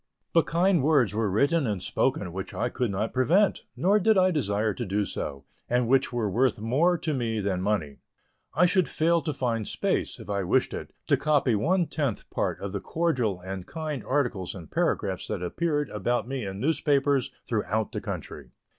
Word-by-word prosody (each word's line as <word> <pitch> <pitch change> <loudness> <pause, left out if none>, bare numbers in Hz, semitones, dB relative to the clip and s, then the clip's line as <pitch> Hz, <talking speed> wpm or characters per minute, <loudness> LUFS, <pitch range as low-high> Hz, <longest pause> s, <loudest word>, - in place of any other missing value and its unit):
But 165 - +4
kind 175 0 +3
words 135 -8 +3
were 110 -1 0
written 140 - +2
and 105 -3 -1
spoken 85 0 -1
which 95 +1 -6
I 125 - 0
could 125 -1 -1
not 100 +3 -2
prevent, 170 +11 +2
nor 200 +4 +3
did 215 +1 +4
I 185 0 +4
desire 110 - 0
to - - -4
do 100 +2 0
so, 70 -7 -5 0.2
and 125 0 +2
which 135 +2 +3
were 120 -3 -1
worth 120 +4 +2
more 145 +12 +2
to 160 -2 -2
me 115 -4 -1
than 95 -3 -1
money. 90 -8 -1 0.6
I 180 - +5
should 185 0 +2
fail 170 +1 +2
to 155 - -2
find 120 -6 -2
space, - - -1
if - - -10
I 100 -1 -1
wished 90 - +1
it, - - -6
to - - +3
copy 145 -5 +2
one 170 - +2
tenth 140 -7 -2
part - - -1
of 100 - -4
the 100 -1 -3
cordial 130 - 0
and 95 0 -6
kind 155 -4 -4
articles 125 -11 -1
and 85 -5 -10
paragraphs - - 0
that - - -3
appeared 150 - -1
about 120 +3 -1
me 130 -5 -3
in 95 0 -6
newspapers 140 -1 +2 0.2
throughout 110 -1 -1
the - - -4
country. - - -6
125 Hz, 190 wpm, -27 LUFS, 105-155 Hz, 0.6 s, I